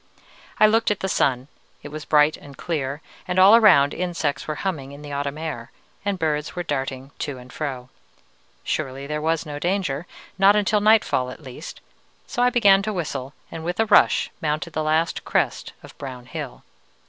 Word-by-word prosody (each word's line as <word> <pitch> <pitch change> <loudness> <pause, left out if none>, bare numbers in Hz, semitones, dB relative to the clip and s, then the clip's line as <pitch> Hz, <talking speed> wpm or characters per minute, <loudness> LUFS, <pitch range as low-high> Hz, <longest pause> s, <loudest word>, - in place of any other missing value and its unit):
I - - +8
looked 225 +2 +3
at 210 - -1
the 190 - -1
sun; 130 -7 +1 0.4
it - - -7
was 155 +1 -7
bright 150 0 +4
and 140 -1 -14
clear, 145 -3 -3 0.2
and 180 0 -2
all 195 +4 +8
around 180 -11 +6
insects 175 -6 -2
were 155 - -2
humming 140 -8 -3
in 145 +1 -11
the 145 - -8
autumn 140 +1 -3
air, 155 -8 -5 0.3
and 200 -1 -1
birds 155 -2 -1
were 175 - -2
darting 135 -3 -4
to 145 -3 -4
and 125 0 -13
fro. 130 -4 -5 0.7
Surely 135 +1 -3
there 150 +1 -3
was 160 +1 0
no 145 -1 -6
danger, 175 -4 -1 0.3
not 195 +1 +6
until 210 0 +2
nightfall 210 -12 +3
at 140 - -10
least; 135 +4 -9 0.4
so 245 - -3
I 245 - +5
began 200 -5 +5
to 215 +1 -3
whistle, 140 -6 -4 0.2
and 160 - -6
with 175 +4 -3
a 225 - +4
rush 210 - +4
mounted 155 +1 -2
the 155 - -1
last 155 +2 0
crest - - -1
of - - -13
brown 125 -3 -7
hill. 145 -1 -7
155 Hz, 185 wpm, -23 LUFS, 140-185 Hz, 0.7 s, I